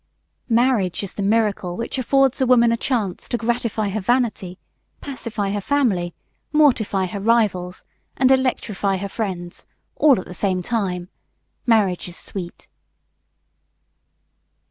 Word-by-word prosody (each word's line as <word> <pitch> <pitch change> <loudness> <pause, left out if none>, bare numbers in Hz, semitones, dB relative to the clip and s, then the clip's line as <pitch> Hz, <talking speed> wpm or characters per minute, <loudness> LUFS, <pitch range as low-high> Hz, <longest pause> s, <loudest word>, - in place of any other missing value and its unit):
Marriage 230 -6 +2
is 195 - -5
the - - -5
miracle 200 -4 0
which 235 +3 -3
affords 270 +1 +2
a 260 - +3
woman 235 -2 +5
a - - +3
chance 225 -7 -2
to 240 - 0
gratify 230 -2 -1
her 210 +2 -2
vanity, 215 -5 0 0.4
pacify 225 -7 -4
her 205 0 -2
family, 195 -10 0 0.4
mortify 235 -10 +3
her 190 +2 -5
rivals, 200 -5 +1 0.3
and 260 0 +4
electrify 220 -7 +1
her 200 +2 -4
friends, 185 -4 -5 0.3
all 280 -7 +5
at - - -7
the 180 - -9
same 185 0 -1
time. 185 -5 -2 0.6
Marriage 205 -7 +2
is 175 - -8
sweet! 175 -3 -7
210 Hz, 130 wpm, -21 LUFS, 185-240 Hz, 0.6 s, woman